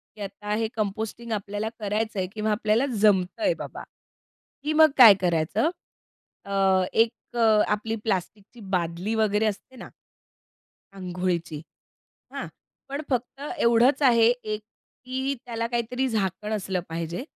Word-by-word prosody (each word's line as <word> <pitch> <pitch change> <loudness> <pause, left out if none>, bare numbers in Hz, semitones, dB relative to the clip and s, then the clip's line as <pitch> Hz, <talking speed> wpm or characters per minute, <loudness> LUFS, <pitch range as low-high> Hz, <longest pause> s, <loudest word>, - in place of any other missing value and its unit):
की 215 - -12
आता 205 +1 -5
हे 225 +1 0
कंपोस्टिंग 220 +2 -3
आपल्याला 205 +1 -3
करायचं 215 0 -2
आहे 185 - -1
किंवा 215 0 -1
आपल्याला 215 +3 +2 0.2
जमतंय 210 - +3
बाबा, - - -7 0.8
की 305 +1 0
मग 315 -1 +6
काय 235 -6 +11
करायचं? 170 - +1 0.8
अ, 195 -1 +2
एक 225 0 +4 0.2
अ, - - -1 0.3
आपली 215 +2 -1
प्लास्टिकची 205 +2 -3 0.2
बादली 175 +4 -2
वगैरे 215 -1 +2
असते 215 +5 -4
ना 245 - -9 1.1
अंघोळीची. 180 -4 -3 0.7
हां, - - -4 0.4
पण 280 +2 -3
फक्त 255 +1 -2 0.2
एवढंच 240 +4 +4
आहे 235 -4 +5 0.2
एक 215 0 -3 0.4
की 265 +2 -2
त्याला 230 -1 -3
काहीतरी 240 +2 -1
झाकण 210 -1 -2
असलं 190 -3 -2
पाहिजे, 165 +5 -4
215 Hz, 130 wpm, -25 LUFS, 195-235 Hz, 1.1 s, काय